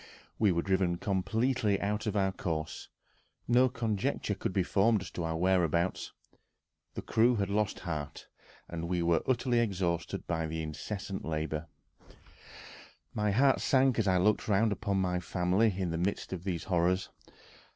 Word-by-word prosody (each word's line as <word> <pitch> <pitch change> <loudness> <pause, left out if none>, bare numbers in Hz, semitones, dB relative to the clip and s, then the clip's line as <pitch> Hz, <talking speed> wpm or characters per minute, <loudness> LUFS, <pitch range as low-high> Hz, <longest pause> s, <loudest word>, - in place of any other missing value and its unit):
We 105 -3 +4
were 85 -1 0
driven 95 -2 +1
completely 105 +3 0
out 105 +2 -2
of 105 - -1
our 95 -2 +2
course; 80 -4 -4 0.6
no 125 +2 +4
conjecture 115 -1 -1
could 100 - -3
be 95 0 +1
formed 100 +3 +2
as - - -9
to 85 - -4
our 80 0 -2
whereabouts. 90 -1 +1 0.8
The - - -5
crew 115 +2 +3
had 100 -2 -1
lost 105 0 0
heart, 75 -5 -5 0.4
and 85 0 -5
were 85 -2 +2
utterly 125 -1 +2
exhausted 90 -7 -1
by 80 0 -1
incessant 80 +5 -5
labor.... 80 0 -3 1.5
My 105 0 0
heart 130 +6 +3
sank 130 -3 +3
as 105 - +1
I 95 -1 +3
looked 105 +4 +2
round 105 +1 +3
upon 100 -1 -1
my 90 -1 0
family 90 +5 +1
in 90 -3 -1
the 85 - -2
midst 95 +1 -2
of 90 0 -6
these 90 -4 -2
horrors. 90 +1 +1
95 Hz, 150 wpm, -31 LUFS, 85-105 Hz, 1.5 s, We